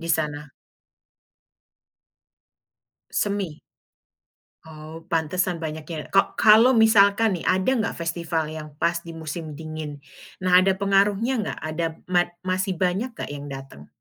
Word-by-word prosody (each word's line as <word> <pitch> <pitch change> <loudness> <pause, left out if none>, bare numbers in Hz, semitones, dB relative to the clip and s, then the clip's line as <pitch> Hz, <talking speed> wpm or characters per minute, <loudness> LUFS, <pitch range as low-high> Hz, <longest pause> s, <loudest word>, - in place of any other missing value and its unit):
Di 165 - -6
sana. 150 -2 -1 2.6
Semi? 200 -7 -2 1.0
Oh, 160 +1 -11
pantesan 170 +1 -1
banyak 155 -1 -5
ya, 165 -1 -6
ko 195 - +3
kalau 225 +4 +6
misalkan 220 -2 +4
nih, - - -9
ada 185 +4 +2
nggak 220 - -2
festival 165 -2 -2
yang 155 -1 -8
pas 170 0 +2
di 165 - -8
musim 160 -1 -6
dingin? 155 -2 -7 0.4
Nah 185 0 +5
ada 190 +1 +3
pengaruhnya 200 +4 +2
nggak? 210 - -3
Ada 155 +2 -2 0.2
mat 175 -1 +3
masih 185 +1 -1
banyak 190 +8 -1
enggak - - -6
yang 145 0 -7
datang? 135 - -10
170 Hz, 130 wpm, -24 LUFS, 155-195 Hz, 2.6 s, kalau